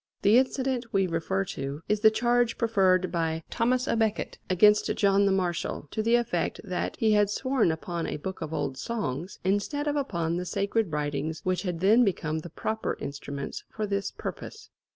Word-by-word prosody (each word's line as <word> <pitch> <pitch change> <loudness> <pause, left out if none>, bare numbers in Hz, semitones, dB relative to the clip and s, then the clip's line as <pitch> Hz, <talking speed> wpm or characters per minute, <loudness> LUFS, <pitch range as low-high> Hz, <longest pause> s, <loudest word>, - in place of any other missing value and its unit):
The 215 +5 +7
incident 260 -2 -1
we 195 -1 +2
refer 185 +3 -1
to 140 -2 -5
is 210 0 +1
the 220 +1 +7
charge 240 +1 +1
preferred 190 -5 +2
by 165 -1 -1
Thomas 250 +2 +1
à - - 0
Becket 220 -2 -1
against 210 +3 +5
John 200 0 +3
the - - +3
Marshal, 175 -5 -1
to 220 - -1
the 230 +2 +3
effect 220 -8 0
that 180 - -3
he 220 -1 +2
had 210 -1 +4
sworn 260 -3 +1
upon 165 +1 -3
a - - -3
"book 190 +5 -6
of 160 -1 -4
old 135 -4 -2
songs" 190 - -3
instead 205 +10 0
of 295 - 0
upon 170 - -1
the 180 - -3
sacred 200 +1 0
writings 150 +1 -2
which 185 -1 0
had 175 -4 -3
then 220 +6 +6
become 160 -6 -1
the 170 - -8
proper 220 +7 -3
instruments 140 0 -6
for 215 - -3
this 200 -1 -1
purpose. 440 0 -8
195 Hz, 185 wpm, -27 LUFS, 165-225 Hz, -, The